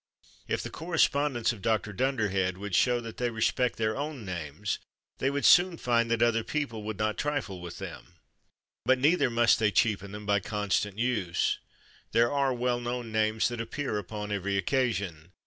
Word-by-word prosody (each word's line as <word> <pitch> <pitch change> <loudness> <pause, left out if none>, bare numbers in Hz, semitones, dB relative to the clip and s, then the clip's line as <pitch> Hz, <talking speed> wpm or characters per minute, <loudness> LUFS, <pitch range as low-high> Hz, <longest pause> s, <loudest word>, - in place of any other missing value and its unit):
If - - -1
the - - -6
correspondents 145 -7 +1
of 105 - -11
Dr. 105 -1 0
Dunderhead 100 -6 0
would 100 0 -6
show 125 +6 +3
that 115 -1 -8
they 125 -1 0
respected 120 +2 0
their 110 -1 0
own 145 -4 -4
names, 85 +2 -4 0.4
they 135 - +2
would 140 0 -1
soon 175 -1 +6
find 115 -3 +1
that 115 0 +2
other 115 -1 +2
people 130 -7 -3
would 105 -1 -5
not 110 +1 -1
trifle 145 -11 -2
with 85 -1 -8
them. - - -9 0.7
But 130 +2 +4
neither 145 +2 +3
must 120 0 +4
they 110 -1 +3
cheapen 100 -2 +1
them 105 0 -8
by 100 0 +3
constant 105 0 -1
use. 110 -8 0 0.5
There 120 0 +4
are 140 -2 +2
well 125 0 0
known 120 -1 -4
names 110 0 +2
that 120 -1 -4
appear 115 -1 -3
upon 105 +1 -6
every 100 -1 -1
occasion. 100 - -1
115 Hz, 175 wpm, -29 LUFS, 105-125 Hz, 0.7 s, soon